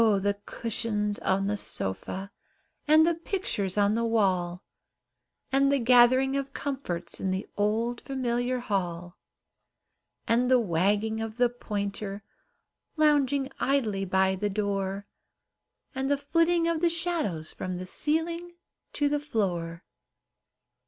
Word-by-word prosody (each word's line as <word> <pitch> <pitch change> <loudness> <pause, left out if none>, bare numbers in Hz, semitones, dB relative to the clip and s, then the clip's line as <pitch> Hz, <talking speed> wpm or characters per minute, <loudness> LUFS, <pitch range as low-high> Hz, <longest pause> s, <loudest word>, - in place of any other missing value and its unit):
the 205 -2 +3
cushions 210 -2 -1
on 195 +1 +1
the 205 +1 0
sofa, 190 - -4 0.6
And 310 +1 +6
the 340 - +3
pictures 330 - -3
on 205 0 +3
the 230 +1 0
wall, 185 -6 +1 0.9
And 275 +1 +3
the 280 - +3
gathering 255 +2 +5
of 275 0 -3
comforts, 265 -12 -4
In 190 - -1
the 190 +1 -2
old 225 +4 0
familiar 250 -1 -1
hall; 175 -5 -3 1.1
And 240 +2 +2
the 255 -1 +6
wagging 210 +3 +1
of 225 0 -5
the 245 -1 +4
pointer, 205 -3 -4 0.7
Lounging 285 -3 +2
idly 225 -8 +1
by 190 0 +2
the 205 +2 -1
door, 200 -1 -2 0.9
And 265 +1 -2
the 285 - +3
flitting 330 +4 +2
of 335 -1 0
the 345 - +4
shadows 330 - 0
From 185 -1 -4
the 185 - -6
ceiling 335 - -1 0.4
to 290 - +1
the 295 0 +1
floor. 180 - -2
225 Hz, 125 wpm, -28 LUFS, 195-275 Hz, 1.1 s, And